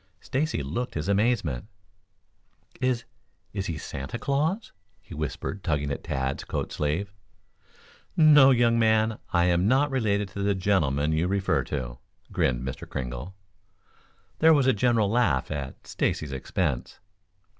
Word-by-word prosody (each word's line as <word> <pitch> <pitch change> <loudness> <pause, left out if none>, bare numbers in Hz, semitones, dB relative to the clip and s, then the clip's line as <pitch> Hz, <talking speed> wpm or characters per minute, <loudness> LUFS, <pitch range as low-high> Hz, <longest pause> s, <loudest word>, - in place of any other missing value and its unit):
Stacy 140 - -1
looked 120 - -4
his 75 +2 -2
amazement. 100 - +1 1.1
"Is 125 -2 +1 0.5
is 95 -1 -3
he 85 - -3
Santa 70 - -5
Claus?" 155 - -1 0.3
he 90 - -13
whispered, 75 +6 -4
tugging 75 -3 -1
at - - -4
Tad's 65 0 -2
coat - - -3
sleeve. 85 +7 -2 1.0
"No, 150 -4 +8
young 120 -2 +4
man. 110 -1 +2
I 85 -1 +3
am 90 +1 +2
not 135 +4 +3
related 105 -6 0
to 100 - -6
the 100 0 +1
gentleman 80 -7 +1
you 80 +3 +1
refer 100 0 +1
to," - - -4 0.3
grinned 65 0 0
Mr. 65 - -6
Kringle. 65 +8 -5 1.0
There 160 0 +6
was 140 -3 +3
a 130 - +5
general 115 -1 +2
laugh 105 - +1
at 70 -3 -5
Stacy's 75 -2 -1
expense. 65 0 -2
95 Hz, 135 wpm, -26 LUFS, 75-120 Hz, 1.1 s, No